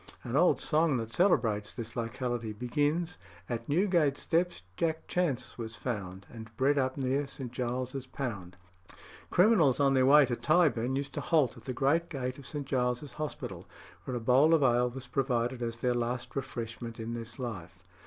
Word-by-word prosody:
An 120 - -4
old 175 +5 +4
song 155 -3 +2
that 115 -1 -5
celebrates 110 - +2
this 115 -2 -6
locality 120 -1 -3
begins 145 - -1 0.3
"At 120 +3 -4
Newgate 165 -4 +2
steps 175 - 0
Jack 160 - -1
Chance 140 -10 -1
was 115 0 -5
found, 100 -5 -5
And 110 -1 -9
bred 140 +2 +3
up 130 0 0
near 135 +1 0
St. 135 -3 -7
Giles's 125 +1 -3
Pound." 100 -11 -5 0.7
Criminals 180 - +4
on 140 -1 +4
their 130 -1 +4
way 145 +1 +8
to 120 -1 -2
Tyburn 140 -6 +2
used 140 0 -3
to - - -3
"halt 155 -7 +2
at - - -14
the 130 - -3
great 145 +7 +1
gate 130 -3 -4
of 140 - -9
St. 145 -2 -4
Giles's 125 0 -1
Hospital, 155 +2 -5 0.4
where 125 - -3
a - - -2
bowl 130 +8 +5
of 155 - +2
ale 125 -1 +3
was 130 +1 -8
provided 125 -1 -1
as 115 -1 -2
their 125 +1 +1
last 120 +1 -3
refreshment 115 -3 -5
in 115 +1 -4
this 115 0 -6
life." 95 -8 -6
130 Hz, 175 wpm, -30 LUFS, 120-145 Hz, 0.7 s, way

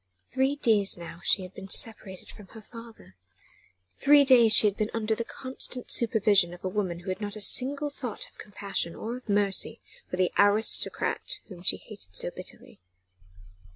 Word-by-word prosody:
Three 265 - -1
days 215 -9 +1
now 170 0 -10
she 195 - +2
had 185 +1 -11
been 195 0 -11
separated 195 -3 -2
from 205 - -13
her - - -10
father 230 - -14 0.8
three 290 +1 +5
days 240 -4 +6
she 215 - +8
had 205 -2 +2
been 215 0 -2
under 220 -1 -1
the 235 - -3
constant 255 0 -4
supervision 205 -6 +4
of 175 - -19
a - - -2
woman 185 -3 -3
who 185 - -8
had 185 +3 -4
not 205 0 -5
a - - -7
single 275 +7 +1
thought 250 -6 -5
of - - -26
compassion 195 -4 -3
or 230 +2 -5
of 250 - -16
mercy 200 -1 0 0.3
for 180 - -4
the 185 -1 +1
"aristocrat" 205 +2 +1
whom 180 -3 -11
she 180 - +1
hated 200 - -14
so - - 0
bitterly. - - -11
210 Hz, 180 wpm, -27 LUFS, 190-235 Hz, 0.8 s, she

